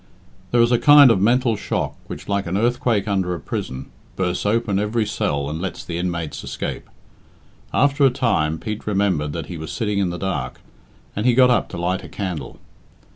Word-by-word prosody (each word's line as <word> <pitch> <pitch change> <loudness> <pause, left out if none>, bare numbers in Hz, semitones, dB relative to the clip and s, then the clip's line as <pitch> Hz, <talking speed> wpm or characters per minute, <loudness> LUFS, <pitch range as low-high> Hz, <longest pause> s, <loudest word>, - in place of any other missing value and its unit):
IX. - - -30
There 120 - +3
is 120 - +2
a 120 - +4
kind 145 -3 +8
of 95 - +2
mental 120 +2 +3
shock 105 - -3
which, - - -8
like 100 -2 -1
an 90 +3 -1
earthquake 115 -2 +1
under 95 -3 0
a - - -7
prison, 65 -2 -5 0.2
bursts 90 +1 -1
open 105 -2 +1
every 105 +2 0
cell 70 -8 -1
and 80 +3 -4
lets 95 - -5
the 85 -1 -4
inmates 85 -3 -3
escape. - - -5 0.8
After 140 +1 +2
a 135 - +7
time, 100 - 0
Pete 105 +5 -6
remembered 95 -8 +1
that 85 - -4
he 90 - -7
was 80 0 -6
sitting 105 -4 -1
in 95 -3 +1
the 90 - -4
dark, 75 -10 -3 0.6
and 105 +4 0
he 120 - +4
got 125 0 +6
up 125 - +1
to 90 - -7
light 90 +2 -1
a - - -10
candle. 85 - -5
100 Hz, 200 wpm, -21 LUFS, 85-115 Hz, 0.8 s, kind